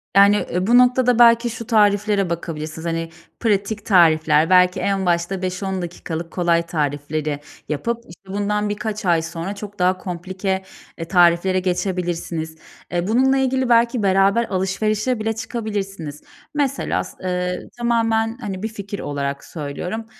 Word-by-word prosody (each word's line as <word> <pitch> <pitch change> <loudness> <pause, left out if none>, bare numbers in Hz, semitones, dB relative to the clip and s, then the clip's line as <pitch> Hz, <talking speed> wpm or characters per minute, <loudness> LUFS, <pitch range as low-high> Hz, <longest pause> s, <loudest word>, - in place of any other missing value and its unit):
Yani, 200 +1 +6
ııı, 180 +2 -1
bu 240 +2 +6
noktada 250 -1 +4
belki 235 0 +6
şu 230 -1 -7
tariflere 205 -3 +3
bakabilirsiniz. 160 -1 -5
Hani, 165 0 -2 0.3
pratik 205 -1 0
tarifler, 160 -4 +4
belki 180 0 +5
en 195 -1 0
başta 175 +2 0
5-10 185 +1 -3
dakikalık 170 -1 -6
kolay 170 -2 +2
tarifleri 150 -1 -2 0.3
yapıp, 190 +11 -1
işte, 185 +3 -16
bundan 210 +1 0
birkaç 210 0 -4
ay 170 -2 +3
sonra 170 +4 -5
çok 205 0 -9
daha 185 +1 +3
komplike, 190 +1 -3 0.3
eee, 165 - -5
tariflere 175 +1 +4
geçebilirsiniz. 175 -3 -2 0.4
Eee, 175 +1 -1
bununla 260 +5 +3
ilgili 260 -1 +1
belki 235 -1 +3
beraber 195 +3 +3
alışverişe 215 +5 0
bile 225 +1 -1
çıkabilirsiniz. 200 - -5 0.3
Mesela, 275 -2 0
s - - -13
ııı, 180 0 -2
tamamen, 225 -1 +1
hani, 195 -3 -5
bir - - 0
fikir 200 -2 -7
olarak 140 -1 -3
söylüyorum. 180 +8 -5
190 Hz, 140 wpm, -21 LUFS, 170-220 Hz, 0.4 s, Yani